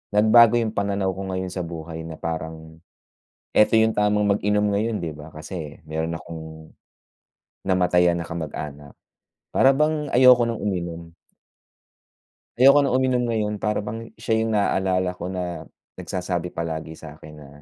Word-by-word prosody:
nagbago 110 Hz, +2 st, +6 dB
'yung 115 Hz, -2 st, -1 dB
pananaw 100 Hz, -1 st, 0 dB
ko 95 Hz, +1 st, -6 dB
ngayon 95 Hz, 0 st, -3 dB
sa 90 Hz, -, -3 dB
buhay 80 Hz, -1 st, -7 dB
na 80 Hz, -, -7 dB
parang, 80 Hz, 0 st, -6 dB, 0.8 s
'eto 105 Hz, -, +5 dB
'yung 110 Hz, 0 st, +2 dB
tamang 105 Hz, 0 st, +2 dB
mag-inom 105 Hz, +1 st, +1 dB
ngayon 110 Hz, +2 st, 0 dB
'di 80 Hz, -, -3 dB
ba, 75 Hz, 0 st, -10 dB
kasi 75 Hz, 0 st, -8 dB
meron 80 Hz, +1 st, -2 dB
akong, 80 Hz, -1 st, -10 dB, 0.9 s
namatayan 90 Hz, -2 st, +3 dB
na 85 Hz, -, -4 dB
kamag-anak. 75 Hz, -3 st, -6 dB, 0.6 s
Para 135 Hz, -, +5 dB
bang 150 Hz, 0 st, 0 dB
ayoko 125 Hz, -1 st, +7 dB
nang 115 Hz, -, -3 dB
uminom. 85 Hz, -4 st, -4 dB, 1.5 s
Ayoko 140 Hz, +3 st, +6 dB
na 130 Hz, -, 0 dB
uminom 130 Hz, -1 st, +1 dB
ngayon 110 Hz, -2 st, -1 dB
para 105 Hz, 0 st, -1 dB
bang 115 Hz, +2 st, -7 dB
siya 110 Hz, -, -2 dB
'yung 110 Hz, 0 st, 0 dB
naalala 95 Hz, -2 st, +1 dB
ko 85 Hz, -, -5 dB
na 90 Hz, -2 st, -5 dB, 0.3 s
nagsasabi 90 Hz, -1 st, -4 dB
palagi 80 Hz, -1 st, -4 dB
sa'kin 75 Hz, -1 st, -12 dB
na, 75 Hz, -2 st, -13 dB
95 Hz, 145 wpm, -23 LUFS, 80-110 Hz, 1.5 s, ayoko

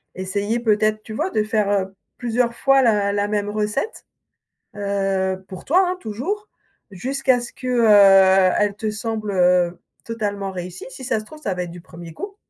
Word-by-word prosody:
essayer 200 Hz, +5 st, -2 dB
peut-être, 215 Hz, -1 st, +1 dB
tu 220 Hz, -, -9 dB
vois, 315 Hz, +11 st, -1 dB
de 215 Hz, -, +1 dB
faire, 215 Hz, -2 st, 0 dB
heu, 195 Hz, -1 st, -1 dB, 0.2 s
plusieurs 240 Hz, 0 st, 0 dB
fois 270 Hz, 0 st, +4 dB
la 205 Hz, -4 st, +2 dB
la 205 Hz, 0 st, 0 dB
même 205 Hz, -1 st, -1 dB
recette, 215 Hz, -, -3 dB, 0.7 s
heu- 195 Hz, -2 st, -1 dB
pour 185 Hz, -1 st, -10 dB
toi, 365 Hz, +6 st, +4 dB
hein, 365 Hz, -, -2 dB
toujours- 310 Hz, -, -4 dB, 0.4 s
jusqu'à 260 Hz, +5 st, 0 dB
ce 240 Hz, -, -8 dB
que, -, -, -11 dB
heu, 195 Hz, -5 st, +6 dB
elle 205 Hz, -1 st, +1 dB
te 215 Hz, +1 st, -3 dB
semble, 215 Hz, -1 st, -4 dB
heu, 180 Hz, -1 st, +2 dB, 0.3 s
totalement 205 Hz, -4 st, -3 dB
réussie. 180 Hz, -1 st, -7 dB
Si 265 Hz, -, -10 dB
ça 250 Hz, -3 st, 0 dB
se 215 Hz, -, -10 dB
trouve, 305 Hz, +7 st, -13 dB
ça 200 Hz, -, -2 dB
va 180 Hz, -, -2 dB
être 175 Hz, -, -8 dB
du 175 Hz, 0 st, -10 dB
1er 170 Hz, -2 st, -11 dB
coup, 400 Hz, -, -7 dB
210 Hz, 180 wpm, -21 LUFS, 190-235 Hz, 0.7 s, heu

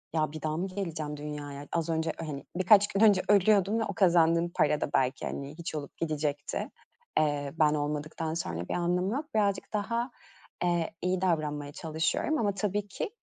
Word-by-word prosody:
"Ya, 155 Hz, -1 st, +1 dB
bir 155 Hz, -, -7 dB
daha 155 Hz, +1 st, -1 dB
mı 185 Hz, +3 st, -1 dB
geleceğim 165 Hz, -6 st, -4 dB
dünyaya? 145 Hz, -1 st, -6 dB
Az 165 Hz, -1 st, 0 dB
önce, 160 Hz, 0 st, 0 dB
hani, 150 Hz, -4 st, -5 dB
birkaç 200 Hz, +2 st, +6 dB
gün 200 Hz, 0 st, -1 dB
önce 205 Hz, -4 st, +6 dB
ölüyordum 205 Hz, +1 st, +4 dB
ve -, -, +1 dB
o -, -, -4 dB
kazandığım 170 Hz, -3 st, +4 dB
para 150 Hz, 0 st, +2 dB
da -, -, -1 dB
belki, 130 Hz, 0 st, +1 dB
hani, 140 Hz, +2 st, -5 dB
hiç 165 Hz, -, -5 dB
olup 145 Hz, -2 st, -6 dB
gidecekti. 150 Hz, -3 st, -2 dB, 0.5 s
Eee, 145 Hz, -2 st, 0 dB
ben 150 Hz, -1 st, +5 dB
olmadıktan 150 Hz, +2 st, -2 dB
sonra 85 Hz, -, -3 dB
bir -, -, -1 dB
anlamı 180 Hz, +3 st, +1 dB
yok." 285 Hz, +4 st, -2 dB
Birazcık 200 Hz, -1 st, +1 dB
daha, 230 Hz, +4 st, -1 dB, 0.5 s
eee, 175 Hz, -2 st, +1 dB
iyi 180 Hz, 0 st, 0 dB
davranmaya 150 Hz, -5 st, 0 dB
çalışıyorum 160 Hz, -, -1 dB
ama 205 Hz, -2 st, +1 dB
tabii 205 Hz, +1 st, -1 dB
ki 195 Hz, -, -4 dB
165 Hz, 175 wpm, -29 LUFS, 150-195 Hz, 0.5 s, birkaç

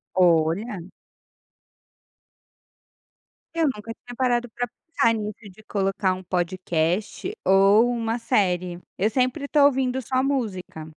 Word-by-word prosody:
Olha. 175 Hz, +3 st, +2 dB, 2.7 s
Eu 330 Hz, -1 st, +1 dB
nunca 225 Hz, -6 st, -2 dB
tinha 245 Hz, +1 st, -12 dB
parado 245 Hz, -1 st, +1 dB
para 245 Hz, +1 st, -3 dB, 0.2 s
pensar 230 Hz, -7 st, +3 dB
nisso, 210 Hz, -2 st, -4 dB
de 205 Hz, +4 st, -17 dB
colocar 195 Hz, -2 st, 0 dB
um 185 Hz, -, -8 dB
podcast 180 Hz, -, -1 dB
ou 195 Hz, +4 st, +5 dB
uma 230 Hz, 0 st, -1 dB
série. 180 Hz, -5 st, 0 dB, 0.2 s
Eu 210 Hz, +4 st, +2 dB
sempre 255 Hz, +4 st, 0 dB
estou 285 Hz, 0 st, +3 dB
ouvindo 265 Hz, -2 st, +1 dB
só 255 Hz, +1 st, 0 dB
música. 215 Hz, -, -3 dB
215 Hz, 115 wpm, -24 LUFS, 185-245 Hz, 2.7 s, ou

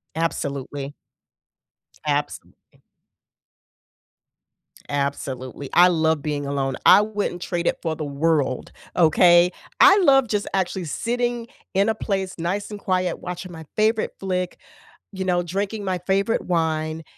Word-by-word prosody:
Absolutely. 140 Hz, -3 st, -3 dB, 1.1 s
Absolutely. 145 Hz, 0 st, -4 dB, 2.1 s
Absolutely. 140 Hz, -1 st, -3 dB
I 175 Hz, +1 st, +7 dB
love 160 Hz, -3 st, +1 dB
being 145 Hz, -1 st, -3 dB
alone. 135 Hz, -1 st, -1 dB
I 195 Hz, -, +8 dB
wouldn't 210 Hz, -4 st, -3 dB
trade 175 Hz, -1 st, -2 dB
it -, -, 0 dB
for 160 Hz, -1 st, -2 dB
the 155 Hz, -, -5 dB
world, 145 Hz, -2 st, 0 dB, 0.2 s
okay? 175 Hz, +1 st, +5 dB, 0.3 s
I 385 Hz, +2 st, +8 dB
love 270 Hz, -8 st, +5 dB
just 210 Hz, -1 st, -1 dB
actually 185 Hz, -1 st, -1 dB
sitting 240 Hz, -, -2 dB, 0.3 s
in 200 Hz, +3 st, +3 dB
a 220 Hz, -, +1 dB
place 190 Hz, -2 st, -2 dB
nice 190 Hz, +5 st, -3 dB
and 210 Hz, -, -6 dB
quiet, 185 Hz, -2 st, -1 dB
watching 180 Hz, 0 st, -6 dB
my 160 Hz, -2 st, -10 dB
favorite 215 Hz, +1 st, +1 dB
flick, 185 Hz, -2 st, -2 dB, 0.5 s
you 190 Hz, -2 st, -4 dB
know, 175 Hz, -1 st, +1 dB
drinking 200 Hz, +4 st, -3 dB
my 185 Hz, -2 st, -1 dB
favorite 195 Hz, +4 st, 0 dB
wine, 160 Hz, -2 st, -1 dB
175 Hz, 125 wpm, -23 LUFS, 155-195 Hz, 2.1 s, I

